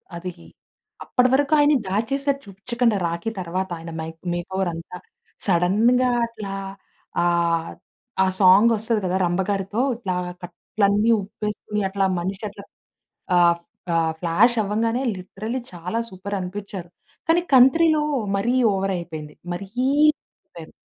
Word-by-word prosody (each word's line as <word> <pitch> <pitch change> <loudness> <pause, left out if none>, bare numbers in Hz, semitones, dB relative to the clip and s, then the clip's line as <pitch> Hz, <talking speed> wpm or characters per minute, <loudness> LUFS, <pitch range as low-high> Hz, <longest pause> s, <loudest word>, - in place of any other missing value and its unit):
అది 180 +1 -5 0.7
అప్పటి 250 -1 +2
వరకు 285 +2 +2
ఆయన 290 +1 +5
దాచేసారు 275 +8 0
చూపిచ్చకండా 225 +3 0
రాఖీ 170 +6 -3
తర్వాత 185 +2 -3
ఆయన 165 0 -8
మైక్ 160 0 -6 0.2
మేకోవర్ 185 +1 -2
అంత. 165 +1 -9 0.5
సడెన్‌గా 215 +8 +3 0.2
అట్లా 215 -4 -7 0.7
ఆహ్, 170 -1 +1 0.5
ఆ - - +3
సాంగ్ 200 +4 +7
వస్తది 220 +1 0
కదా! 185 +1 0
రంబ 175 +2 0
గారితో 200 +2 -1 0.2
ఇట్లా 195 -6 -3 0.3
కట్లన్ని 205 +4 +1
ఉప్పేసుకొని 210 +1 -4
అట్లా 195 0 0
మనిషి 190 +4 -4
అట్లా 200 0 -12 0.7
ఆహ్, 170 -1 +4 0.4
ఆహ్, 165 -1 +2
ఫ్లాష్ 205 +9 +3
అవ్వంగానే 225 +5 0
లిటరల్లీ 215 +7 -5
చాలా 180 +7 -3
సూపర్ 195 +2 -5
అనిపిచ్చారు. 185 -1 -6 0.4
కానీ 345 +2 +4
కంత్రీలో 310 +5 +6 0.4
మరి 235 +5 0 0.2
ఓవర్ 195 0 -1
అయిపోయింది 155 -3 -7 0.2
మరీ 190 +2 -6 0.4
అయిపోయారు. 305 - -3
195 Hz, 120 wpm, -23 LUFS, 175-230 Hz, 0.7 s, సాంగ్